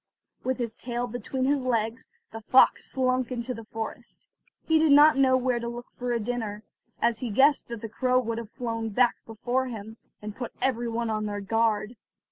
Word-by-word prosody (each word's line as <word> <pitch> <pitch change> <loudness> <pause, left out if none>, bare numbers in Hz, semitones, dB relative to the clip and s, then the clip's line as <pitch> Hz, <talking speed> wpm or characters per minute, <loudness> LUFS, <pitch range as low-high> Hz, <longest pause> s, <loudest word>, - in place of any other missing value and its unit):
With 260 0 -1
his 235 -3 -3
tail 240 0 -3
between 245 +2 -3
his 280 0 +2
legs, 230 -1 -1 0.2
the 225 - -8
fox 255 +4 +4
slunk 255 -1 0
into 250 0 -3
the 230 -2 -9
forest. 220 0 -7 0.4
He 320 -1 +4
did 315 -2 +4
not 300 +2 +8
know 265 -1 +4
where 250 -1 0
to 235 - -4
look 240 +1 -7
for 245 0 -4
a 235 - +1
dinner, 220 -2 -4 0.4
as 235 -1 +1
he 250 - -3
guessed 275 +7 +3
that 235 -2 -7
the 225 - -4
crow 250 +3 +1
would 230 -2 -2
have 230 -3 -8
flown 230 -2 -4
back 240 +3 +2
before 245 +4 -1
him, 220 -2 -8 0.2
and 210 0 -7
put 245 -3 -6
every 245 -2 0
one 230 0 -2
on 215 0 -1
their 205 0 -3
guard. 220 +2 0
235 Hz, 200 wpm, -27 LUFS, 225-255 Hz, 0.4 s, not